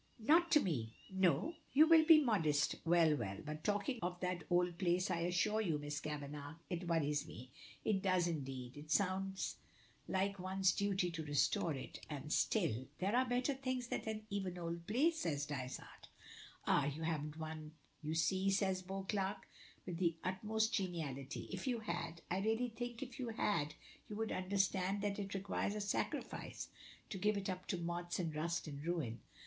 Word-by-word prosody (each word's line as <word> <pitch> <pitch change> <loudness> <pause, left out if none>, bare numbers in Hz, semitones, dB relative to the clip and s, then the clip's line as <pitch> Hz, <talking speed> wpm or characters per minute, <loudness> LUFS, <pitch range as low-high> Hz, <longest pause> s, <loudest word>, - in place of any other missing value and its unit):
"Not 335 +5 +6
to 300 - +9
me." 120 - -1 0.2
"No? 190 - +3 0.2
You 300 +3 +8
will 325 -1 +8
be 310 -1 +8
modest? 155 - +3
Well, 165 -2 +5
well! 100 -7 -3
But 155 +1 -5
talking 205 +5 0
of 180 0 -2
that 180 -2 -1
old 175 -1 +2
place, 180 +1 +2
I 170 - +1
assure 180 +6 +2
you, 170 -8 +1
Miss 145 0 -3
Kavanagh, 145 0 -5 0.2
it 175 0 -2
worries 150 -3 +1
me 125 +2 -10 0.3
it 195 -3 +2
does, 185 -2 +3
indeed. 135 -5 -4
It 150 +1 -9
sounds 190 +2 +1 0.5
like 195 +1 0
one's 190 0 +2
duty 195 -2 +1
to 165 -1 -4
restore 145 +1 +2
it, 130 - -7
and 150 0 -3
still 135 - +1
" - - -34
"There 195 +5 +1
are 255 0 +3
better 250 +3 +2
things 255 -2 -2
than 215 -1 -2
even 195 -3 -1
an - - -9
old 170 0 -4
place," 315 +9 +3
says 145 -4 0
Dysart. 130 -3 -6 0.6
"Ah! 140 - +4
you 150 +3 -3
haven't 155 -1 -2
one 155 -1 -6 0.3
you 155 +1 -2
see," 190 +5 +2
cries 190 -2 +1
Beauclerk, 195 +1 -2 0.4
with 175 -2 -4
the 170 -3 +2
utmost 215 +4 0
geniality. 155 -8 -2
"If - - -4
you 240 -3 0
had 170 -6 -4
I 185 - +2
really 225 +4 +1
think 240 +2 -4
if 250 -1 -9
you 245 -2 -2
had 170 -9 0 0.3
you 210 - -4
would 220 +1 -1
understand 190 +1 +1
that 205 0 0
it 200 0 -3
requires 195 +1 -1
a - - -2
sacrifice 205 0 -2 0.4
to 195 - -3
give 210 +1 +2
it 195 -1 -1
up 185 0 -6
to 185 - 0
moths 175 0 -2
and 165 -4 -1
rust 170 +3 -1
and 145 -1 -6
ruin." 160 -9 -1
180 Hz, 180 wpm, -38 LUFS, 155-205 Hz, 0.6 s, to